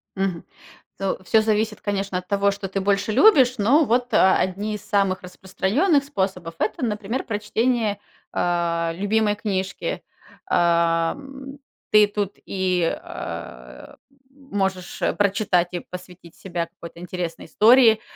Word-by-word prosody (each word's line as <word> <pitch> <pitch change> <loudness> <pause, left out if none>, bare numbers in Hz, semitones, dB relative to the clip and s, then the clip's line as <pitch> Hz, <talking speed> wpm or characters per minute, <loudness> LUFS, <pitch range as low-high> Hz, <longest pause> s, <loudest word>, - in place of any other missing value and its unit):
Мгм. 190 -3 -2 0.5
Ну, 195 -1 -1
всё 220 +2 +4
зависит, 215 0 0
конечно, 200 -2 -2
от 180 - -13
того, 200 0 +2
что 195 -1 -6
ты 195 - -2
больше 200 +2 +1
любишь, 260 - +5
но 250 +10 +4
вот, 245 0 0
а, 190 -2 +5
одни 200 +4 -2
из 210 - -8
самых 195 -2 +1
распространенных 220 - 0
способов- 190 - -3
это, 215 +3 -1
например, 215 +3 -3
прочтение, 215 0 -1 0.3
а, 170 -1 0
любимой 205 +2 +1
книжки. 200 - -3 0.5
А, 170 -1 +2
м, 275 0 -11 0.3
ты 210 -1 +6
тут 205 -1 -3
и, 185 -2 0 0.2
а, 60 0 -9 0.4
м, 275 0 -22
можешь, 190 -3 -2
э, - - +1
прочитать 195 -3 +1
и 175 - -2
посвятить 180 -2 -12
себя 175 -3 -4
какой-то 170 0 -12
интересной 175 -1 -5
истории. 225 -1 +5
200 Hz, 135 wpm, -23 LUFS, 180-220 Hz, 0.5 s, ты